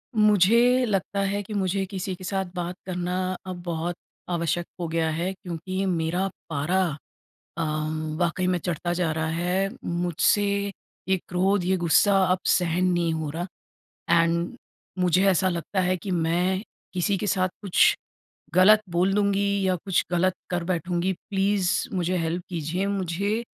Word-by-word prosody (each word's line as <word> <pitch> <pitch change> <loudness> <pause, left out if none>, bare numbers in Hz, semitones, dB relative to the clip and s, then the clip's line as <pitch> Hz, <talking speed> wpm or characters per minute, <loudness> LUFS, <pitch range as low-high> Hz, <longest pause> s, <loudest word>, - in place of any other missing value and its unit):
मुझे 220 +5 +5
लगता 200 -2 -1
है 200 +1 -1
कि 210 - -8
मुझे 195 -1 0
किसी 190 -1 -3
के 185 - -12
साथ 190 +1 -1
बात 175 0 -3
करना 180 -1 -2 0.3
अब 180 -1 -5
बहुत 170 0 -2 0.3
आवश्यक 170 0 0
हो 170 - -2
गया 165 0 0
है 170 +4 -1
क्योंकि 185 +1 -4
मेरा 175 +1 0 0.2
पारा 160 +5 +1 0.8
अ, - - 0 0.6
वाक़ई 180 +1 0
में 180 -1 +1
चढ़ता 175 0 -2
जा 175 -2 0
रहा 160 0 -1
है। 180 +4 0 0.2
मुझसे 175 +4 +2 0.6
ये 190 - +4
क्रोध, 190 +1 +1
ये 190 +1 +2
गुस्सा 180 +3 +4 0.2
अब 185 - +1
सहन 175 0 +2
नहीं 170 -1 +1
हो 160 -1 -3
रहा। 170 +4 -4 0.8
एंड 170 +6 0 0.4
मुझे 180 +1 +3
ऐसा 185 0 +2
लगता 175 +2 -2
है 185 0 +1
कि 185 +3 -6
मैं 180 +2 +1 0.3
किसी 190 +2 +1
के 210 - -2
साथ 185 -1 +2
कुछ 195 -4 +4 0.6
ग़लत 210 +4 +7
बोल 180 +3 +2
दूँगी 200 -1 +2 0.2
या 185 - +2
कुछ 190 -3 +1
ग़लत 180 +1 +2 0.2
कर 175 -1 -1
बैठूँगी, 175 +1 0
प्लीज़ 195 0 0 0.2
मुझे 180 0 0
हेल्प 165 +2 -2
कीजिए, 175 +3 -2
मुझे 200 +3 -1
180 Hz, 155 wpm, -25 LUFS, 170-195 Hz, 0.8 s, ग़लत